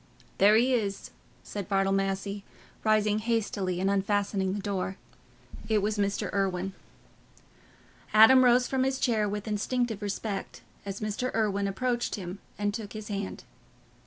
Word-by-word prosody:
"There 205 +2 +7
he 250 +4 +4
is," 205 -5 -2 0.3
said 205 -2 -6
Bartle 195 -1 +2
Massey, 195 +1 -1 0.4
rising 215 -1 +3
hastily 210 -5 -1
and 190 - +1
unfastening 200 -1 0
the 205 - -3
door. 195 -1 -3 0.7
It 220 - +3
was 210 0 -1
Mr. 200 0 -1
Irwine. 195 -1 -1 1.4
Adam 225 +5 +8
rose 245 0 +5
from 265 -1 0
his 265 0 0
chair 220 -5 +1
with 205 +1 -4
instinctive 220 +1 -1
respect, 205 0 -4 0.3
as 195 +1 -5
Mr. 215 +4 -2
Irwine 200 -3 +1
approached 240 +4 -1
him 185 -1 -7 0.2
and 205 0 -1
took 210 -2 -6
his 215 -1 -7
hand. 200 -1 -4
205 Hz, 140 wpm, -28 LUFS, 195-220 Hz, 1.4 s, Adam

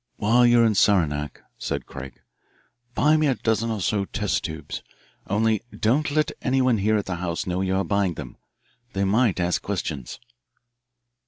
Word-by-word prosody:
"While 120 +4 +4
you're 120 -1 +5
in 110 - +3
Saranac," 75 -8 +1 0.2
said - - -3
Craig, 70 -1 -9 0.7
"buy 155 +1 +4
me 155 -1 +2
a 135 - +2
dozen 115 0 0
or 110 -3 -2
so 100 +1 0
test 105 +1 -1
tubes. 80 -3 -6 0.5
Only, 110 +1 +1 0.2
don't 135 +8 +2
let 155 +1 +1
anyone 130 -3 +2
here 110 +2 +2
at 105 - -2
the 90 -2 -3
house 85 -1 -3
know 90 0 -1
you 95 0 0
are 95 - +1
buying 100 -4 0
them. 65 -4 -8 0.6
They 100 - 0
might 105 0 +2
ask 90 0 0
questions." 80 -10 -4
100 Hz, 165 wpm, -24 LUFS, 90-115 Hz, 0.7 s, you're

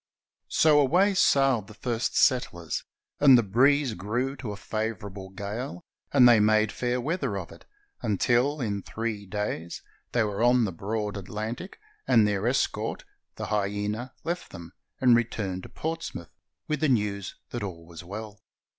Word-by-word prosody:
So 155 -2 +5
away 180 +9 +4
sailed 135 - +3
the 110 - -13
first 120 0 -2
settlers, 85 -10 +1 0.4
and 135 -3 +8
the 120 - +3
breeze 130 +5 +3
grew 120 +8 -2
to 115 -5 -5
a 100 - -6
favorable 105 -3 -4
gale, 105 - -6 0.3
and 130 -3 +7
they 120 -2 +7
made 110 0 +3
fair 125 0 -1
weather 160 +9 -2
of - - -6
it, - - -15 0.4
until 120 +7 +1
in 100 -4 -2
three 110 -1 -4
days 95 -4 -4 0.3
they 120 - +2
were 105 0 -2
on 120 0 +5
the 100 - -2
broad 105 +4 -3
Atlantic, 110 - -6 0.3
and 110 -2 +5
their 105 +1 0
escort, 125 +2 -1 0.3
the - - -5
Hyena, 105 +4 -2
left 175 +2 -3
them, 85 0 -10 0.3
and 125 -2 +6
returned 105 -5 -1
to - - -11
Portsmouth 160 - -5 0.4
with 150 - -1
the 155 - +2
news 105 -6 0 0.2
that 120 - -4
all 85 -5 -6
was 85 -1 -10
well. 105 +3 -8
110 Hz, 155 wpm, -27 LUFS, 100-130 Hz, 0.4 s, and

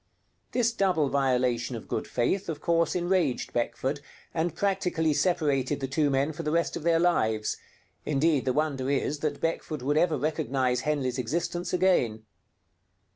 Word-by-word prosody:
This 230 -2 +1
double 180 -9 +2
violation 125 -3 +1
of 115 - -8
good - - -3
faith 175 +11 0
of 160 - -3
course 170 0 +1
enraged 175 -6 0
Beckford, 130 +4 -1 0.3
and 165 +1 -1
practically 180 -5 +1
separated 145 -5 +1
the 135 - -2
two 145 +2 +1
men 140 +3 +1
for 155 - -6
the 150 - -2
rest 170 +2 0
of - - -4
their 165 +1 +3
lives; 110 -11 +1 0.5
indeed, 150 -1 +1
the 130 - +2
wonder 140 -3 -1
is 140 +1 0
that 145 -2 -2
Beckford 160 -3 -2
would 145 +3 +1
ever 160 -2 +3
recognize 130 -3 0
Henley's 140 -4 -1
existence 170 +7 -2
again. 150 -13 +2
150 Hz, 155 wpm, -27 LUFS, 130-170 Hz, 0.5 s, their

